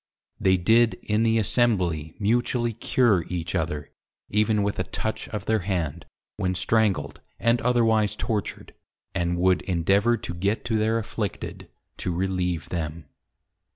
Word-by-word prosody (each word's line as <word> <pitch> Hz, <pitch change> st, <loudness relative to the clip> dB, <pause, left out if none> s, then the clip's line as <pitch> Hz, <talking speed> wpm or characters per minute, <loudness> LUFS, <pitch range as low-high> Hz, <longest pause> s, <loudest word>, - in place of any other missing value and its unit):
They 95 Hz, 0 st, +4 dB
did 110 Hz, +3 st, +4 dB
in 105 Hz, +1 st, +1 dB
the 115 Hz, 0 st, +3 dB
Assembly 95 Hz, -9 st, +1 dB
mutually 120 Hz, +2 st, +1 dB
Cure 115 Hz, -4 st, +2 dB
each 85 Hz, -2 st, -4 dB
other, 80 Hz, -4 st, -2 dB, 0.4 s
even 105 Hz, 0 st, +2 dB
with 100 Hz, 0 st, -2 dB
a -, -, +2 dB
Touch 110 Hz, -, -4 dB
of 105 Hz, -3 st, -5 dB
their 110 Hz, 0 st, +2 dB
Hand, 85 Hz, -6 st, -3 dB, 0.3 s
when 95 Hz, -3 st, -1 dB
Strangled, 100 Hz, -8 st, +1 dB, 0.2 s
and 115 Hz, +1 st, +2 dB
otherwise 115 Hz, -4 st, +2 dB
Tortured; 105 Hz, -3 st, -3 dB, 0.4 s
and 85 Hz, 0 st, 0 dB
would 90 Hz, 0 st, +3 dB
endeavour 100 Hz, +6 st, +2 dB
to 90 Hz, -, -6 dB
get 100 Hz, +7 st, -1 dB
to 115 Hz, -2 st, +1 dB
their 110 Hz, +1 st, +2 dB
Afflicted, 110 Hz, -2 st, -4 dB, 0.3 s
to 90 Hz, -, -2 dB
relieve 90 Hz, -2 st, -1 dB
them. 80 Hz, -2 st, -4 dB
100 Hz, 140 wpm, -25 LUFS, 90-110 Hz, 0.4 s, They